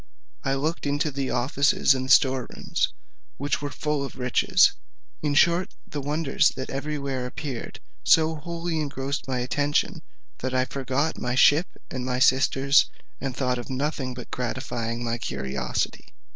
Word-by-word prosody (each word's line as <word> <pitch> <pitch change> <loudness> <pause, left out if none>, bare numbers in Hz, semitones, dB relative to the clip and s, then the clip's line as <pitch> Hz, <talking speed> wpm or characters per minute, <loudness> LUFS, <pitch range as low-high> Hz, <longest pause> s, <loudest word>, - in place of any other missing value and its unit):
I 135 0 +1
looked 150 +2 -2
into 145 +2 0
the 135 -1 -2
offices 140 +2 +3
and 130 0 -3
store 130 -3 +5
rooms, - - -1 0.5
which 140 +1 -1
were 145 - -3
full 150 -1 -2
of 135 - -6
riches. 125 -1 +4 0.5
In 145 -1 0
short, 170 +4 +3
the 145 - -4
wonders 150 +1 +2
that 130 - -5
everywhere 140 -2 -3
appeared 130 -1 -6 0.2
so 160 0 +5
wholly 165 +1 -3
engrossed 140 -2 -3
my 130 -2 -1
attention, 145 +4 0 0.4
that 130 0 -2
I 130 0 +3
forgot 135 +4 -1
my 125 0 -1
ship 150 +6 +5 0.2
and 130 -1 -3
my 125 0 -1
sisters, 135 +2 +4 0.3
and 135 -2 -4
thought 125 -2 0
of 120 - -7
nothing 130 -1 -2
but 125 - -9
gratifying 120 -2 -3
my 120 0 -2
curiosity. 65 - -3
135 Hz, 150 wpm, -25 LUFS, 125-145 Hz, 0.5 s, store